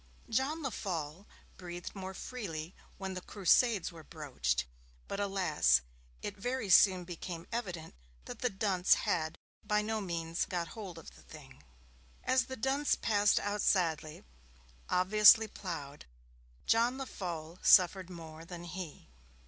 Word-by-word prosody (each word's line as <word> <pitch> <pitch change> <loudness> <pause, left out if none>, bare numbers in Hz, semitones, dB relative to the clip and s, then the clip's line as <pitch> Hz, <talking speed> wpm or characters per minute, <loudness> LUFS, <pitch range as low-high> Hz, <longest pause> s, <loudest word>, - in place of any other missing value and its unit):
John 275 +7 0
Lefolle 180 - -4 0.3
breathed 175 -1 -7
more 190 -1 -7
freely 180 -10 -6 0.2
when 190 -1 -4
the 185 - -5
Crusades 205 +1 +2
were 165 -2 -12
broached; 125 - -2 0.4
but, 200 - -4
alas, 180 - +3 0.4
it 205 - -4
very 245 0 -2
soon 185 -1 +6
became 170 -1 -7
evident 180 -9 -4 0.3
that - - -8
the 250 - +1
dunce 190 -3 +3
had 165 -6 0 0.3
by 210 0 +1
no 220 0 -2
means 170 -3 -2
'got 175 -2 -3
hold 195 -7 -8
of 165 - -12
the - - -16
thing'. 135 -4 -14 0.6
As 255 0 +2
the 260 - -7
dunce 270 +5 +1
passed 205 -2 +3
out 205 0 -2
sadly, 160 -5 0 0.7
obviously 210 +4 +7
ploughed, 150 -8 -7 0.6
John 235 +3 +3
Lefolle 175 -10 -6
suffered 185 -1 +5
more 165 -2 -9
than 170 0 -8
he. 175 - -7
185 Hz, 130 wpm, -32 LUFS, 165-210 Hz, 0.7 s, obviously